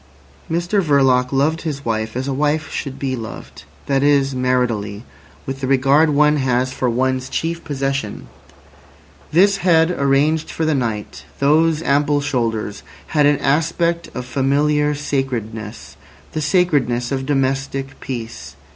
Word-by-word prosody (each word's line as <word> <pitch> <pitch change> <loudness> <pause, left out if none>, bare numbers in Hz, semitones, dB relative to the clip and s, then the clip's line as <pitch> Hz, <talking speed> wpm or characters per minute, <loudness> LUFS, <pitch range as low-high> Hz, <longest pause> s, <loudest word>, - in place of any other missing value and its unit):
Mr 175 +5 +1
Verloc 135 -5 +3
loved 145 +4 +1
his 145 -3 -5
wife 110 0 -2
as 130 +2 -3
a 135 - -1
wife 150 +3 0
should 135 -2 -4
be 135 -2 -2
loved—that 125 +3 -5
is, 140 -1 +3
maritally, 120 -5 -1 0.4
with 135 0 -5
the 130 - -1
regard 135 +4 +4
one 150 +1 +3
has 130 -1 0
for 130 - -1
one's 130 +2 0
chief 165 +3 -3
possession. 135 -6 -3 1.1
This 195 +5 +4
head 165 -2 +3
arranged 150 +1 +1
for 160 - -2
the 155 - +2
night, 115 -6 -3
those 155 +3 +3
ample 145 +1 +2
shoulders, 115 -7 -2 0.3
had 150 -2 +4
an 145 0 +3
aspect 170 +4 0
of 125 - -4
familiar 145 +3 +1
sacredness—the 115 - -5
sacredness 145 -7 +1
of 135 -1 -2
domestic 135 -1 -1
peace. 120 -3 -7
135 Hz, 130 wpm, -19 LUFS, 125-150 Hz, 1.1 s, regard